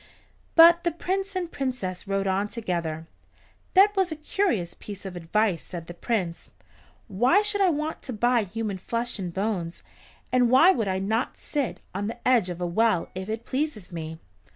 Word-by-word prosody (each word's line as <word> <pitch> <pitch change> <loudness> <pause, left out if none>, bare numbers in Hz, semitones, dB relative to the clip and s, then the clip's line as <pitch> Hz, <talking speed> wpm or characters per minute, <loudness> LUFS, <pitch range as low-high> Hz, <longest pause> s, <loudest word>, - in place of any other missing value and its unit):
But 340 +1 +8
the 345 - +2
Prince 385 +4 -3
and 350 -2 -2
Princess 245 -10 -4
rode 195 0 0
on 195 +2 +1
together. 170 -8 -3 0.7
"That 405 +2 +6
was 380 -3 +1
a - - -2
curious 305 - -1
piece 200 -1 -10
of 190 -2 -6
advice," 175 +1 0
said 170 -3 -8
the 175 - -8
Prince. 180 -3 -3 0.6
"Why 245 - +3
should 415 -1 +1
I 380 - +5
want 305 0 -2
to 255 - -6
buy 240 +1 +2
human 205 0 -4
flesh 235 +3 -3
and 180 -3 -3
bones, 190 -3 -3 0.5
and 250 -1 +4
why 320 +10 +7
should 225 -4 -1
I 190 0 0
not 220 +6 -1
sit 285 -5 -3
on 200 +2 -2
the 235 +2 -5
edge 235 -8 +4
of 175 -1 -5
a 180 - -1
well 185 0 +1
if 185 +2 -6
it 225 +2 -4
pleases 265 - -3
me?" 160 -1 -6
220 Hz, 180 wpm, -26 LUFS, 185-290 Hz, 0.7 s, But